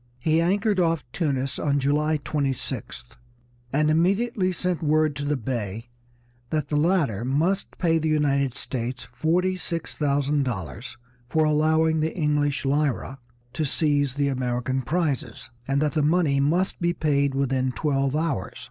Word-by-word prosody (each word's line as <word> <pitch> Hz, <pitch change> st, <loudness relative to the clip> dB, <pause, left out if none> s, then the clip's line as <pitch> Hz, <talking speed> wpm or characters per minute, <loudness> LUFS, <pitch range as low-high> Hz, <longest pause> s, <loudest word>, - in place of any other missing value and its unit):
He 155 Hz, +6 st, +2 dB
anchored 200 Hz, +3 st, +1 dB
off 165 Hz, -6 st, +1 dB
Tunis 140 Hz, -5 st, -1 dB
on 145 Hz, -1 st, +1 dB
July 150 Hz, +3 st, +1 dB
26th, 135 Hz, -5 st, -4 dB, 0.5 s
and 150 Hz, +2 st, +2 dB
immediately 185 Hz, +5 st, +2 dB
sent 180 Hz, -1 st, -2 dB
word 155 Hz, -1 st, +2 dB
to 145 Hz, -, -3 dB
the 145 Hz, 0 st, 0 dB
Bey 115 Hz, -2 st, -4 dB, 0.6 s
that 150 Hz, -1 st, -1 dB
the 150 Hz, -, -1 dB
latter 150 Hz, -, +1 dB
must 160 Hz, +10 st, 0 dB
pay 165 Hz, -2 st, +2 dB
the 160 Hz, 0 st, -1 dB
United 140 Hz, -4 st, +1 dB
States 120 Hz, -1 st, -4 dB
forty 180 Hz, +8 st, +1 dB
six 165 Hz, -1 st, -4 dB
thousand 145 Hz, 0 st, +1 dB
dollars 115 Hz, -, -5 dB, 0.3 s
for 155 Hz, +2 st, +2 dB
allowing 160 Hz, +1 st, +2 dB
the 160 Hz, +3 st, -1 dB
English 145 Hz, -3 st, 0 dB
Lyra 135 Hz, -1 st, 0 dB, 0.3 s
to 155 Hz, -, -1 dB
seize 145 Hz, -2 st, +1 dB
the 145 Hz, -1 st, +1 dB
American 130 Hz, 0 st, -1 dB
prizes, 155 Hz, 0 st, -2 dB, 0.2 s
and 135 Hz, 0 st, +1 dB
that 150 Hz, -, +1 dB
the 155 Hz, -, 0 dB
money 150 Hz, -2 st, +2 dB
must 175 Hz, +8 st, +1 dB
be 170 Hz, 0 st, +2 dB
paid 140 Hz, -4 st, +1 dB
within 130 Hz, -1 st, 0 dB
twelve 135 Hz, 0 st, 0 dB
hours. 150 Hz, -, -2 dB
145 Hz, 150 wpm, -25 LUFS, 135-160 Hz, 0.6 s, He